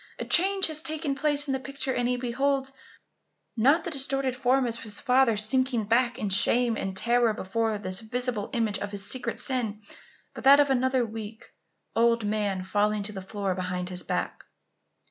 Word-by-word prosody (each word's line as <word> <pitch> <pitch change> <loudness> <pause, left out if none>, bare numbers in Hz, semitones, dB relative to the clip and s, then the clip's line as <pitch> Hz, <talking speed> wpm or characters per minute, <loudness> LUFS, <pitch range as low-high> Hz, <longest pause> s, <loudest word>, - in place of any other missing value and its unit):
a - - -4
change 385 +2 +3
has 310 -1 -1
taken 315 -2 -2
place 290 +1 +2
in 275 - -2
the 265 - -1
picture 275 0 -3
and 245 -1 0
he 250 - 0
beholds, 270 +2 -1 0.8
not 280 +8 +3
the 345 - -4
distorted 270 -2 0
form 260 +1 +2
of 230 -1 -3
his 210 -2 -4
father 255 -4 +3
sinking 245 +2 +1
back 235 +3 +1
in 210 - -3
shame 230 +4 +2
and 190 -2 -4
terror 235 +1 +2
before 220 +2 -1
this 185 -2 -5
visible 240 -1 -2
image 225 -4 0
of 205 - -4
his 200 -2 -4
secret 245 0 -2
sin, 235 -6 -1 0.5
but - - -9
that 275 +2 +8
of 285 -1 +3
another 260 -1 +1
weak, 220 0 -9 0.4
old 230 -1 +2
man 205 -3 -1
falling 205 +2 0
to 210 - -5
the 195 -2 -7
floor 195 0 -3
behind 180 0 -4
his 180 -1 -5
back! - - -3
235 Hz, 185 wpm, -27 LUFS, 210-265 Hz, 0.8 s, that